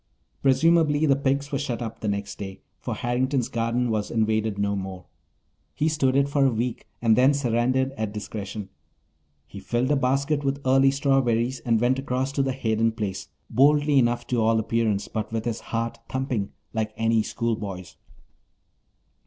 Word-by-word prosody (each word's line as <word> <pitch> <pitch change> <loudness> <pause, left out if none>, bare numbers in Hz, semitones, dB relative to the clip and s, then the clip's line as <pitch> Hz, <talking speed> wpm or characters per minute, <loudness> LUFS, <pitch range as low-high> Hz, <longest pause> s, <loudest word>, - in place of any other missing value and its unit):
Presumably 155 +2 +3
the 140 -3 +4
pigs 140 +1 -1
were 140 - -1
shut 120 -2 -3
up 115 -2 -6
the 110 - -4
next 100 -1 -3
day, 95 -1 -7 0.2
for - - -4
Harrington's 125 +1 0
garden 115 +1 0
was 105 -1 -1
invaded 110 -2 0
no 100 0 0
more. 95 -2 -6 0.7
He 150 - +1
stood 145 -4 +1
it 140 0 +3
for 140 0 +1
a 135 - +5
week 115 +1 -3 0.2
and 115 -1 +5
then 130 +4 +4
surrendered 130 0 +1
at 110 -6 -4
discretion. 105 -1 -6 0.8
He 100 +8 -10
filled 120 +6 -1
a - - +4
basket 140 +2 +1
with 140 0 -1
early 135 +1 +5
strawberries 130 -3 +1
and 115 -2 +1
went 125 +3 +2
across 130 0 -1
to 140 - 0
the 135 -1 0
Hayden 115 -3 0
place, 100 -4 -4 0.2
boldly 145 +1 +4
enough 120 -1 +1
to 120 -2 0
all 110 +1 +3
appearance, 110 -2 0
but 110 0 -4
with 110 0 -3
his 115 -2 -2
heart 115 0 -3
thumping 130 -6 -2 0.2
like 110 -1 -2
any 115 0 +2
schoolboy's. 105 -6 -4
120 Hz, 170 wpm, -25 LUFS, 110-135 Hz, 0.8 s, a